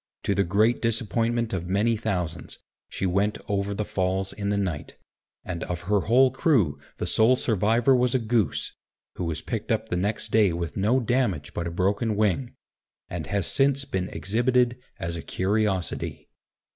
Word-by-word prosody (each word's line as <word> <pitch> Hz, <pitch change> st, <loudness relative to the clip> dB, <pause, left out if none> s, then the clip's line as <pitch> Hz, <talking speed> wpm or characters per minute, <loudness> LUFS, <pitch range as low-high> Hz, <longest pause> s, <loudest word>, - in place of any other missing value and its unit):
To 100 Hz, -, +1 dB
the 100 Hz, 0 st, +2 dB
great 105 Hz, +6 st, +2 dB
disappointment 115 Hz, 0 st, 0 dB
of 90 Hz, -2 st, -3 dB
many 105 Hz, +5 st, +2 dB
thousands, 90 Hz, -7 st, -3 dB, 0.3 s
she -, -, -3 dB
went 100 Hz, +3 st, +1 dB
over 100 Hz, 0 st, -1 dB
the 105 Hz, -, -2 dB
Falls 95 Hz, -1 st, -1 dB
in 100 Hz, 0 st, -3 dB
the 100 Hz, -, +1 dB
night, 90 Hz, -7 st, -3 dB, 0.5 s
and 85 Hz, -2 st, -4 dB
of 90 Hz, 0 st, -4 dB
her 100 Hz, +3 st, +1 dB
whole 125 Hz, +6 st, +4 dB
crew 125 Hz, -, +2 dB, 0.2 s
the -, -, -3 dB
sole 115 Hz, +4 st, +4 dB
survivor 115 Hz, +3 st, +2 dB
was 125 Hz, 0 st, +2 dB
a -, -, +6 dB
goose, 115 Hz, -, 0 dB, 0.4 s
who 90 Hz, -, -2 dB
was 80 Hz, -2 st, -3 dB
picked -, -, -3 dB
up -, -, 0 dB
the 90 Hz, -, 0 dB
next 105 Hz, +4 st, -2 dB
day 105 Hz, -5 st, +4 dB
with 85 Hz, -2 st, -4 dB
no 110 Hz, +7 st, +2 dB
damage 115 Hz, -, 0 dB
but 85 Hz, -, -3 dB
a -, -, -2 dB
broken 100 Hz, +6 st, 0 dB
wing, 110 Hz, +4 st, 0 dB, 0.5 s
and 80 Hz, -4 st, -5 dB
has 100 Hz, 0 st, 0 dB
since 135 Hz, +4 st, +2 dB
been 95 Hz, -6 st, -2 dB
exhibited 120 Hz, +3 st, +1 dB
as 85 Hz, -3 st, -4 dB
a 85 Hz, -, -5 dB
curiosity. 95 Hz, -1 st, -1 dB
100 Hz, 170 wpm, -26 LUFS, 90-115 Hz, 0.5 s, a